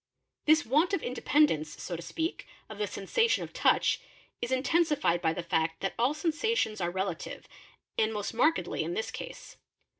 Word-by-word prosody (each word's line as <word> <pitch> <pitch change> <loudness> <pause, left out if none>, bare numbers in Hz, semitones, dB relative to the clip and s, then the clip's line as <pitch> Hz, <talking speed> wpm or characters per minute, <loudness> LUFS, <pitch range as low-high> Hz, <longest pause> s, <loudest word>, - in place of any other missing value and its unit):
pee 310 - +9
This 315 - +1
want 315 - +3
of 330 - -4
independance, 250 - +1
so 175 - -4
to 165 - -6
speak, 325 - -3 0.2
of 215 -1 -9
the 210 - 0
sensation 330 - +1
of - - -9
touch, - - +3 0.4
is 240 - -2
'intensified 285 - +2
by 160 - +2
the 175 +1 -4
fact 165 -1 0
that 195 - -1
all 255 +5 +2
sensations 310 - 0
are 175 - +1
relative, 185 -1 -4 0.5
and 220 0 +3
most 210 0 -3
markedly 305 +8 +2
'in 350 - -3
this 465 +3 -2
case. - - -8
240 Hz, 175 wpm, -30 LUFS, -, 0.5 s, pee